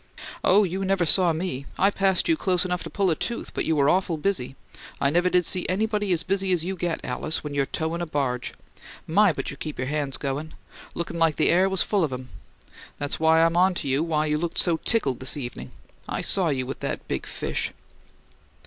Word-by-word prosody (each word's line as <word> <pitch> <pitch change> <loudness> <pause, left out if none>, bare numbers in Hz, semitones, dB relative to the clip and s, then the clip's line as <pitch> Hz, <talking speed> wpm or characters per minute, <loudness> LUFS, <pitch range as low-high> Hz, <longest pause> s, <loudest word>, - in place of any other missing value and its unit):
"Oh, 205 +3 +5
you 190 +1 -2
never 190 -2 +1
saw 175 +1 +5
me! 160 -5 -4
I 195 - +3
passed 195 -2 +2
you 330 - +4
close 185 - 0
enough 180 -1 -2
to - - -5
pull 195 -3 +1
a - - +1
tooth, 235 +9 -4
but - - -2
you 160 - +1
were 140 -2 +3
awful 180 -1 +2
busy. 150 -7 -1 0.4
I 140 - +2
never 175 +3 +2
did 180 -1 +2
see 180 - +2
anybody 210 +1 0
as 170 -2 +1
busy 195 0 0
as 175 -3 +2
you 190 +1 -2
get, 175 -2 -3
Alice, 155 +6 -1
when 150 -1 -5
you're 140 -1 0
towin' 165 +2 -2
a 175 - -3
barge. 130 -5 -2 0.5
My, 200 +4 +4
but - - -4
you 140 - -9
keep 155 0 -6
your 130 - -2
hands 145 -2 -2
goin'! 145 +3 -4 0.4
Looked 170 0 -3
like 165 -2 +2
the - - +2
air 185 +2 +4
was 190 -2 +1
full 200 -4 +1
of 150 - -1
'em! 125 0 -6 0.7
That's 145 0 -3
why 160 0 +4
I'm 165 0 +2
onto 175 -6 +2
why 155 -2 0
you 150 0 0
look 170 0 -3
so 170 -2 +4
tickled 150 - -1
this 130 +2 -2
evening; 120 - -6 0.4
I - - -2
saw 185 -4 +4
you 130 -3 -1
with 135 - -6
that - - -4
big - - -3
fish." - - -3
165 Hz, 220 wpm, -25 LUFS, 145-185 Hz, 0.7 s, Oh